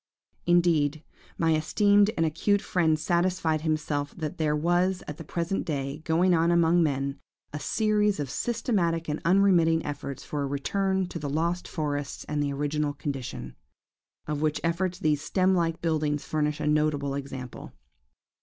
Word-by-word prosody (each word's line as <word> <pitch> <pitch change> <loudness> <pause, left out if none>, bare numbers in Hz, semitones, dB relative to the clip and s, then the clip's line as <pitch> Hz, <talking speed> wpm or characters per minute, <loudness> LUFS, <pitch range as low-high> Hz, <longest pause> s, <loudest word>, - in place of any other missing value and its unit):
"Indeed, 165 -4 +3 0.3
my 165 -1 +2
esteemed 205 +6 +3
and 165 - +2
acute 200 +6 +1
friend 160 -6 +2
satisfied 170 -1 0
himself 150 -2 -2
that 155 -2 -5
there 150 -1 +1
was, 175 +4 +1
at 150 - -6
the - - -8
present 170 +4 -2
day, 140 -1 -3
going 175 +3 +3
on 165 0 +3
among 170 0 +4
men, 140 -3 -1 0.3
a 150 - -3
series 210 0 +1
of 145 - -2
systematic 190 - -1
and 150 0 -3
unremitting 170 -3 +4
efforts 140 -2 -5
for 150 - -3
a 140 - -1
return 190 +7 0
to 170 - -5
the 145 -2 -4
lost 170 +4 -1
forests 145 -3 -3
and 150 -1 -2
the 145 -1 0
original 145 +1 -1
condition; 135 - -5 0.7
of 150 -1 -3
which 155 0 +1
efforts 175 +2 0
these 155 -6 +1
stem 185 +3 +2
like 165 -2 0
buildings 150 -3 0
furnish 150 -1 -1
a 150 - -2
notable 150 -2 +1
example. 135 -3 -7
160 Hz, 155 wpm, -27 LUFS, 145-175 Hz, 0.7 s, among